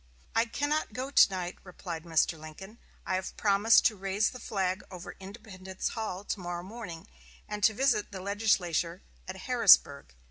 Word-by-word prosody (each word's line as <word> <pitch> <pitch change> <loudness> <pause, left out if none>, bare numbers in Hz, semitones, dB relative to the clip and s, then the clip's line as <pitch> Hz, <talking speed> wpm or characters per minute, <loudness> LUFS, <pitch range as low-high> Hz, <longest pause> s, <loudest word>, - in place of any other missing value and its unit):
"I 230 - +4
cannot 290 +2 -2
go 260 +4 -4
to - - +7
night," 180 -2 -5
replied 175 -3 -8
Mr. 165 0 +2
Lincoln; 160 +8 -11 0.3
"I - - -2
have 185 0 -3
promised 205 +2 +4
to 220 - +3
raise 195 +2 0
the 250 - -9
flag 190 -4 -2
over 180 0 -9
Independence 190 -2 -7
Hall 210 -4 -5
to 205 - -4
morrow 175 -1 -5
morning, 195 -5 -8 0.4
and 210 -1 -5
to 220 - +5
visit 240 -4 +1
the 190 - -7
legislature 185 -4 0 0.2
at 185 - -5
Harrisburg. 185 - +4
195 Hz, 165 wpm, -29 LUFS, 180-220 Hz, 0.4 s, to